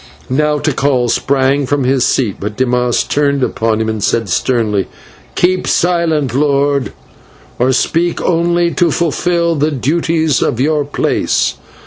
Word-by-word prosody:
Now 150 Hz, +2 st, +1 dB
Tikal 140 Hz, -4 st, 0 dB
sprang 135 Hz, 0 st, +1 dB
from 145 Hz, 0 st, 0 dB
his 130 Hz, 0 st, +1 dB
seat, 115 Hz, -8 st, 0 dB
but 105 Hz, +1 st, -5 dB
Dimas 125 Hz, -1 st, +1 dB
turned 140 Hz, -2 st, 0 dB
upon 110 Hz, -2 st, 0 dB
him 110 Hz, -, -1 dB
and 110 Hz, -2 st, -3 dB
said 115 Hz, -1 st, 0 dB
sternly: 105 Hz, -2 st, 0 dB, 0.5 s
"Keep 185 Hz, +1 st, +1 dB
silent, 165 Hz, -7 st, +1 dB
lord, 140 Hz, 0 st, +1 dB, 0.7 s
or 125 Hz, +2 st, +2 dB
speak 165 Hz, +6 st, 0 dB
only 170 Hz, 0 st, +1 dB
to 175 Hz, 0 st, +1 dB
fulfil 170 Hz, +1 st, 0 dB
the 150 Hz, 0 st, 0 dB
duties 160 Hz, +2 st, 0 dB
of 115 Hz, -, -1 dB
your 150 Hz, +1 st, +1 dB
place. 145 Hz, -, 0 dB
140 Hz, 135 wpm, -14 LUFS, 125-160 Hz, 0.7 s, or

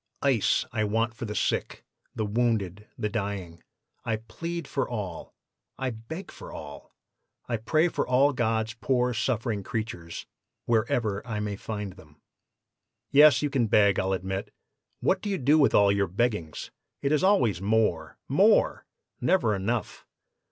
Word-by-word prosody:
Ice 130 Hz, -7 st, +2 dB
I 110 Hz, -, 0 dB
want 110 Hz, +2 st, 0 dB
for 115 Hz, +1 st, -6 dB
the 105 Hz, -1 st, -5 dB
sick, -, -, -1 dB, 0.3 s
the 110 Hz, -, -1 dB
wounded, 105 Hz, -3 st, -1 dB
the 105 Hz, -, -1 dB
dying. 100 Hz, -6 st, -4 dB, 0.4 s
I 115 Hz, -, 0 dB
plead 165 Hz, +9 st, -6 dB
for 135 Hz, -, -2 dB
all, 100 Hz, -8 st, -5 dB, 0.4 s
I 130 Hz, -1 st, -2 dB
beg 120 Hz, -, -8 dB
for -, -, -10 dB
all, 70 Hz, -1 st, -9 dB, 0.6 s
I 120 Hz, -, -1 dB
pray 155 Hz, +10 st, +2 dB
for -, -, -2 dB
all 135 Hz, +3 st, +4 dB
God's 115 Hz, -2 st, 0 dB
poor 125 Hz, +2 st, 0 dB
suffering 115 Hz, -2 st, -1 dB
creatures, 95 Hz, -6 st, -5 dB, 0.4 s
wherever 110 Hz, -2 st, +1 dB
I 110 Hz, -3 st, -3 dB
may 105 Hz, -1 st, -2 dB
find 105 Hz, -1 st, -5 dB
them.' 75 Hz, -5 st, -18 dB, 0.9 s
"'Yes, 150 Hz, 0 st, +7 dB
you 145 Hz, -, 0 dB
can 130 Hz, -5 st, +2 dB
beg, 100 Hz, -2 st, +4 dB
I'll 95 Hz, +1 st, 0 dB
admit. 95 Hz, +1 st, -3 dB, 0.5 s
What 190 Hz, -, +2 dB
do 210 Hz, -, -3 dB
you 195 Hz, -, 0 dB
do 150 Hz, +2 st, +4 dB
with 140 Hz, -, +4 dB
all 100 Hz, -1 st, +6 dB
your 100 Hz, -1 st, +1 dB
beggings? 100 Hz, -4 st, -2 dB, 0.3 s
It 140 Hz, -, +1 dB
is 155 Hz, +1 st, +2 dB
always 125 Hz, -, +3 dB
more, 105 Hz, -6 st, +1 dB
more! -, -, +3 dB, 0.3 s
never 125 Hz, -, +2 dB
enough! 105 Hz, +3 st, -3 dB
110 Hz, 150 wpm, -27 LUFS, 100-125 Hz, 0.9 s, Yes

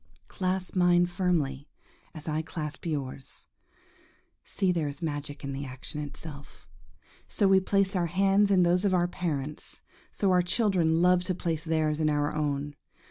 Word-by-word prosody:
Clasp 185 Hz, -1 st, -2 dB
mine 175 Hz, -1 st, +5 dB
firmly 165 Hz, -6 st, -1 dB, 0.5 s
as 155 Hz, 0 st, -10 dB
I 155 Hz, 0 st, 0 dB
clasp 155 Hz, -1 st, -6 dB
yours. 135 Hz, -4 st, -3 dB, 1.0 s
See, 190 Hz, -2 st, 0 dB
there 165 Hz, -4 st, 0 dB
is 145 Hz, +3 st, -6 dB
magic 145 Hz, -2 st, -4 dB
in 140 Hz, 0 st, -4 dB
the 135 Hz, +1 st, -4 dB
action 130 Hz, +2 st, -6 dB
itself! 145 Hz, 0 st, -9 dB, 0.6 s
So 200 Hz, -, +1 dB
we 190 Hz, 0 st, +6 dB
placed 195 Hz, +1 st, +1 dB
our 175 Hz, -2 st, +1 dB
hands 195 Hz, +3 st, +3 dB
in 190 Hz, -2 st, +5 dB
those 175 Hz, +1 st, +3 dB
of 195 Hz, -2 st, +3 dB
our 175 Hz, -1 st, +2 dB
parents; 150 Hz, -5 st, -4 dB, 0.3 s
so 195 Hz, -2 st, +1 dB
our 180 Hz, -1 st, +5 dB
children 175 Hz, -4 st, +2 dB
love 180 Hz, 0 st, +4 dB
to 185 Hz, -, -1 dB
place 165 Hz, -3 st, -2 dB
theirs 155 Hz, -2 st, 0 dB
in 155 Hz, -1 st, +2 dB
our 145 Hz, 0 st, 0 dB
own. 145 Hz, -1 st, -1 dB
165 Hz, 160 wpm, -28 LUFS, 150-185 Hz, 1.0 s, we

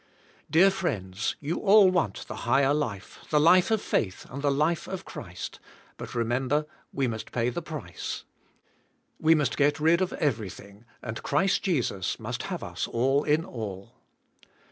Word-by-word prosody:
Dear 190 Hz, +5 st, +6 dB
friends, 105 Hz, -, -2 dB
you 150 Hz, +3 st, -2 dB
all 200 Hz, -2 st, +6 dB
want 165 Hz, -, -1 dB
the 110 Hz, -, -6 dB
higher 135 Hz, +4 st, +3 dB
life, 110 Hz, -10 st, -3 dB
the 150 Hz, -, +3 dB
life 180 Hz, +5 st, +6 dB
of 220 Hz, -2 st, +1 dB
faith, 95 Hz, -3 st, -1 dB
and 140 Hz, +3 st, -5 dB
the 145 Hz, -, +2 dB
life 155 Hz, +4 st, +1 dB
of 190 Hz, -2 st, -5 dB
Christ, -, -, -7 dB, 0.4 s
but -, -, -8 dB
remember, 130 Hz, +5 st, 0 dB, 0.3 s
we 135 Hz, -, 0 dB
must 110 Hz, -2 st, -5 dB
pay 120 Hz, 0 st, 0 dB
the 170 Hz, -, -4 dB
price 155 Hz, -, -6 dB, 1.0 s
We 160 Hz, +1 st, +5 dB
must 150 Hz, -5 st, +1 dB
get 145 Hz, +1 st, +3 dB
rid 165 Hz, +4 st, +4 dB
of 185 Hz, -, 0 dB
everything 105 Hz, -, -3 dB, 0.2 s
and 110 Hz, -2 st, -5 dB
Christ 190 Hz, +7 st, +1 dB
Jesus 120 Hz, -, -1 dB
must -, -, -4 dB
have -, -, -4 dB
us -, -, -3 dB
all 135 Hz, +5 st, +1 dB
in 155 Hz, +3 st, +2 dB
all. 100 Hz, -, -7 dB
140 Hz, 160 wpm, -27 LUFS, 115-165 Hz, 1.0 s, Dear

